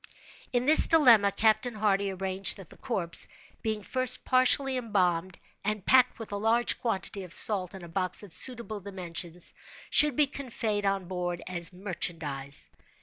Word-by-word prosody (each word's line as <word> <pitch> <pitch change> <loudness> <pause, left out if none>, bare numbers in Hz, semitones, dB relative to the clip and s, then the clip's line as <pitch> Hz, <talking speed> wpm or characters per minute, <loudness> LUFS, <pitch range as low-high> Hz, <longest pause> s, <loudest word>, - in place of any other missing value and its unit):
In 245 0 0
this 310 +3 +7
dilemma, 235 -11 +5
Captain 220 +3 +1
Hardy 200 -2 0
arranged 190 +1 +1
that 195 -5 -13
the - - -14
corpse, 180 -9 -1 0.3
being 215 -2 -3
first 255 +2 +2
partially 260 +1 +3
embalmed, 185 -7 -1 0.3
and 210 -1 -3
packed, 255 -1 +4
with 225 -2 -8
a 205 - -3
large 225 +3 +1
quantity 205 -3 -3
of 180 - -12
salt, 195 -3 0
in 190 - -10
a - - -9
box 185 +4 -2
of 195 -5 -13
suitable 235 -4 0
dimensions, 180 -3 -6 0.4
should 300 -3 +5
be 300 - +4
conveyed 230 -7 -3
on 195 -1 -1
board 175 -1 -4
as 175 -2 +1
merchandise. 165 -7 -4
200 Hz, 155 wpm, -28 LUFS, 180-235 Hz, 0.4 s, this